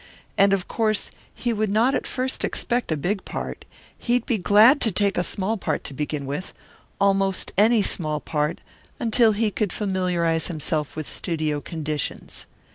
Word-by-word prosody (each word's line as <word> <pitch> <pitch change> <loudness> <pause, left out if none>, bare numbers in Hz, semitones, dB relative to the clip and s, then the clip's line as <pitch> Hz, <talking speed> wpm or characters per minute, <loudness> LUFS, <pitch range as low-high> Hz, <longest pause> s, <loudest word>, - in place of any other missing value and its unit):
And 200 0 +4
of 195 -2 0
course 215 -2 -1 0.2
he 240 -2 -2
would 215 -1 0
not 225 +6 +3
at - - -1
first 260 0 -2
expect 240 -6 -1
a 155 - +1
big 190 +7 -2
part. - - -6 0.3
He 240 - -2
would 245 -1 +1
be 235 -6 0
glad 215 +9 +6
to 225 - +2
take 200 +1 +1
a - - +1
small 200 +5 -1
part - - -2
to - - -6
begin 150 0 -3
with 145 +7 -5 0.4
almost 195 -1 +2
any 215 +2 +4
small 155 -5 0
part 150 +2 -2 0.4
until 230 -1 +4
he 215 0 0
could 205 -2 -1
familiarize 180 -5 0
himself 155 -2 -2
with 155 -2 -5
studio 155 -4 -2
conditions. 155 -2 -4
195 Hz, 170 wpm, -24 LUFS, 160-220 Hz, 0.4 s, glad